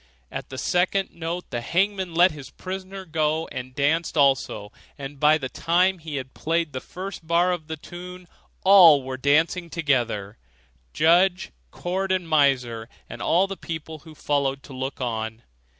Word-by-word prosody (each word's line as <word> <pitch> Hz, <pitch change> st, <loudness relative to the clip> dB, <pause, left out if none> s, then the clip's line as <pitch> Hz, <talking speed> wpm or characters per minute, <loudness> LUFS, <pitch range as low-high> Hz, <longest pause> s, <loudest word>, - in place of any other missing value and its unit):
At -, -, -6 dB
the 130 Hz, -, -7 dB
second 185 Hz, +6 st, +1 dB
note 170 Hz, +1 st, -5 dB
the 120 Hz, -, -2 dB
hangman 190 Hz, +4 st, 0 dB
let 180 Hz, +2 st, +6 dB
his 145 Hz, -3 st, -10 dB
prisoner 190 Hz, +1 st, -7 dB
go, 160 Hz, 0 st, 0 dB
and 130 Hz, 0 st, -7 dB
danced 160 Hz, +4 st, 0 dB
also, 135 Hz, -7 st, +2 dB, 0.3 s
and 140 Hz, 0 st, -8 dB
by 150 Hz, +2 st, +5 dB
the 135 Hz, -4 st, -4 dB
time 180 Hz, +6 st, +1 dB
he 160 Hz, -2 st, -6 dB
had 130 Hz, -1 st, -5 dB
played 165 Hz, -1 st, -1 dB
the 130 Hz, -, -4 dB
first 185 Hz, -2 st, -8 dB
bar 170 Hz, +2 st, +3 dB
of 165 Hz, -4 st, -4 dB
the 160 Hz, 0 st, -5 dB
tune, 180 Hz, +3 st, -10 dB, 0.4 s
all 175 Hz, -8 st, +8 dB
were 130 Hz, 0 st, -5 dB
dancing 160 Hz, +6 st, +1 dB
together 120 Hz, -, -1 dB, 0.5 s
judge, 175 Hz, -, +3 dB, 0.2 s
court, 190 Hz, -, -3 dB
and 185 Hz, -2 st, 0 dB
miser, 125 Hz, -7 st, +1 dB, 0.2 s
and 120 Hz, -, -9 dB
all 175 Hz, +8 st, +3 dB
the 195 Hz, 0 st, -5 dB
people 160 Hz, -2 st, -7 dB
who 155 Hz, +1 st, -14 dB
had -, -, -24 dB
followed 140 Hz, -2 st, -1 dB
to 140 Hz, -, -11 dB
look 130 Hz, +1 st, -5 dB
on. 110 Hz, -2 st, -3 dB
160 Hz, 165 wpm, -24 LUFS, 135-180 Hz, 0.5 s, all